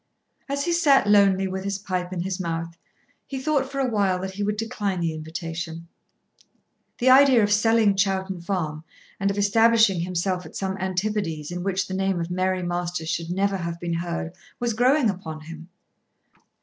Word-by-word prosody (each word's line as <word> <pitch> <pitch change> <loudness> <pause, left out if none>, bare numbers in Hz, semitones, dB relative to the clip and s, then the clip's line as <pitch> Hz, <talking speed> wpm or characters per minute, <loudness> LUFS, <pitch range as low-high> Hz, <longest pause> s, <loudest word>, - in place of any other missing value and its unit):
As 280 +1 -1
he 345 - 0
sat 295 -8 +4
lonely 195 -2 +4
with 190 0 -4
his 200 0 -2
pipe 185 -2 -3
in 180 -2 -3
his 190 +1 -3
mouth 165 -1 -3 0.5
he 270 - -5
thought 280 -1 0
for 275 - -6
a 270 -1 +1
while 200 -5 +1
that 190 0 -4
he 195 +2 -7
would 210 +1 -1
decline 205 -4 -2
the 165 -2 -1
invitation. 165 +1 -6 1.1
The 255 +1 +4
idea 260 -3 +7
of 205 - +1
selling 220 -1 +3
Chowton 190 -2 0
Farm 165 -4 -3 0.4
and 195 - +1
of 200 - -2
establishing 220 -1 +4
himself 180 +1 -1
at - - -12
some 190 -1 -2
Antipodes 185 -4 -2
in 180 0 -4
which 190 0 -1
the 190 - -5
name 190 -1 0
of 170 +1 -4
Mary 185 0 0
Masters 175 -2 -3
should 165 0 -2
never 195 +2 0
have 170 -1 -4
been 170 -1 -3
heard, 170 0 -3 0.3
was 240 -1 0
growing 255 +4 +3
upon 170 -6 -4
him. 165 +2 -10
190 Hz, 180 wpm, -24 LUFS, 170-210 Hz, 1.1 s, idea